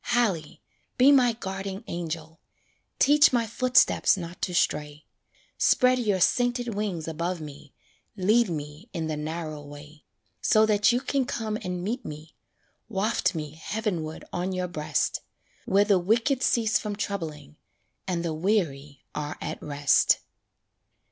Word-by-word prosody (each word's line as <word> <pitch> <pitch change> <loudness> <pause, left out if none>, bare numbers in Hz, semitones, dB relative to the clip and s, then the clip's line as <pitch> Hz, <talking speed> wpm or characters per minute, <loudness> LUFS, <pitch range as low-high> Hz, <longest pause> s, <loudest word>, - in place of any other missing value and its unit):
Hallie! 205 -11 0 0.3
be 260 +3 +7
my 250 -4 +5
guarding 195 -1 -5
angel, 165 -1 -5 0.6
Teach 295 +1 +6
my 240 -2 +2
footsteps 250 -2 +3
not 170 -1 -7
to 185 - -1
stray; 150 -2 0 0.5
Spread 255 0 +4
your 205 -5 +1
sainted 245 +3 +1
wings 200 -6 -3
above 170 +2 -2
me, 145 -2 -11 0.4
Lead 215 +4 +3
me 150 +5 -6
in 165 -3 -2
"the 155 -1 -2
narrow 155 0 -5
way," 145 +1 -12 0.4
So 215 0 +4
that 210 0 +4
you 245 +1 +1
can 275 -1 0
come 220 -3 -3
and 180 -1 -4
meet 235 +7 -3
me 155 +1 -9 0.5
Waft 210 -1 0
me 150 -2 -4
heavenward 165 -1 -4
on 185 +2 -2
your 180 0 -2
breast, 150 -4 -1 0.5
"Where 200 +2 +4
the 200 -3 +4
wicked 230 +8 +1
cease 225 -4 +2
from 210 -1 -4
troubling, 160 -8 -5 0.5
And 175 -2 -1
the 165 - -1
weary 155 -6 -1
are 150 0 -4
at - - -5
rest." 145 -1 +3
185 Hz, 140 wpm, -26 LUFS, 155-220 Hz, 0.6 s, be